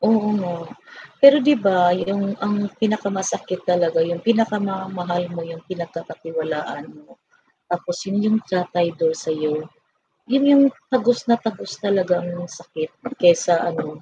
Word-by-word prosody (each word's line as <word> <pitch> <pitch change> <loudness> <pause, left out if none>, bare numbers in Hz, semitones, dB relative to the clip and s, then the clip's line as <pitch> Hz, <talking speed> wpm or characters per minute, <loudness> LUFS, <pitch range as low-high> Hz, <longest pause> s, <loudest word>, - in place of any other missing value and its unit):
Oo 210 -1 +3
nga. 175 -2 -5 0.6
Pero 275 0 +10
'di 295 - +6
ba 180 -3 +4
yung 195 +3 -1
ang 205 0 -1
pinaka-masakit 195 -4 -2
talaga 175 -2 +2
yung 170 +1 -1
pinaka-mamahal 190 -5 -1
mo 170 -1 -6
yung 165 0 -10
pinagkakatiwalaan 165 -4 -6 0.2
mo. - - -24 0.5
Tapos 175 0 -4
yun 200 +1 -1
yung 215 +1 +3
tatraydor 175 -3 0
sayo, 155 0 -3 0.6
yun 270 +3 +2
yung 280 -1 +8 0.3
tagos 245 0 +1
na 235 - +5
tagos 220 -4 -6
talagang 185 -4 +1 0.2
sakit 155 -1 -7 0.3
kaysa 175 -1 +5
ano, 155 -2 -4
180 Hz, 125 wpm, -21 LUFS, 170-205 Hz, 0.6 s, Pero